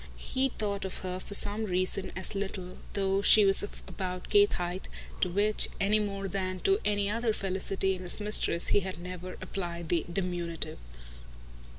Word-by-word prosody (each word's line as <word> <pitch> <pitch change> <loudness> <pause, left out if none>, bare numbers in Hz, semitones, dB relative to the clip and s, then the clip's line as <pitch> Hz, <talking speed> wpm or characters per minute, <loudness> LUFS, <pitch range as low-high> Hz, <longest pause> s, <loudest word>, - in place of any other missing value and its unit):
He 265 +1 0
thought 205 -4 -3
of 190 - -5
her 185 0 -3
for 200 - -2
some 210 +2 +6
reason 185 0 +1
as 185 - +1
little, 190 -2 -5
though 195 0 0
she 210 +1 +7
was 195 0 +6
of 205 - -8
about 185 -1 -6
Kate's 410 0 +5
height, 180 +1 -4 0.3
to 180 - +1
which, 205 +4 +1
any 205 +2 +2
more 195 -2 -3
than 185 -1 -3
to 390 +1 +2
any 205 -1 0
other 225 +2 0
felicity 190 0 -1
in 185 - -7
his 180 +2 0
mistress, 210 -5 +1
he - - +4
had 190 -2 -6
never 180 +1 -7
applied 175 -3 -5
the 170 -2 +1
diminutive. 175 - -3
195 Hz, 175 wpm, -29 LUFS, 180-205 Hz, 0.3 s, she